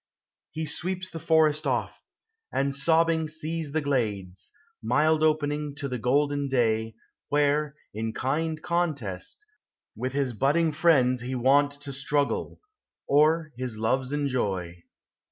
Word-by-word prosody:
He 160 0 -4
sweeps 185 +5 -2
the 165 - -6
forest 155 -2 +3
oft; - - -2 0.5
and 140 0 0
sobbing 160 +3 +2
sees 155 0 -3
The 160 +2 0
glades, 105 -10 -2 0.3
mild 155 +1 +2
opening 150 -2 0
to 145 -1 -4
the 125 -2 -4
golden 145 +3 +1
day, 115 -4 +1 0.3
Where, 145 0 +1 0.2
in 110 +1 -3
kind 155 +7 -1
contest, 155 - -2 0.5
with 130 +1 -3
his 135 -3 0
butting 150 +8 +2
friends 130 -6 +3
He 130 +2 -4
wont 140 +3 +3
to 140 -1 -6
struggle, 140 +1 -1 0.5
or 155 +2 +3
his 125 -3 -4
loves 130 +4 0
enjoy. 100 -12 -2
145 Hz, 125 wpm, -27 LUFS, 125-155 Hz, 0.5 s, forest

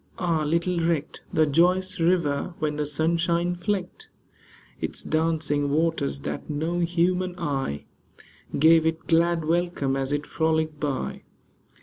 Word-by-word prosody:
Ah! 170 -4 0
little 170 +3 0
recked 165 -3 -1
The 155 - +3
joyous 180 +5 +2
river, 165 -2 +1
when 150 -1 -1
the 150 0 -1
sunshine 170 +3 +1
flecked 185 0 -4 0.7
Its - - -2
dancing 155 -2 0
waters, 145 - 0
that 75 - -5
no 160 +4 -1
human 175 +1 0
eye 135 - -3 0.7
Gave 160 +2 +5
it 160 0 -2
glad 170 0 +2
welcome 165 -5 0
as 135 0 -2
it 145 0 -1
frolicked 160 -1 0
by 145 -4 -3
160 Hz, 125 wpm, -25 LUFS, 150-175 Hz, 0.7 s, Gave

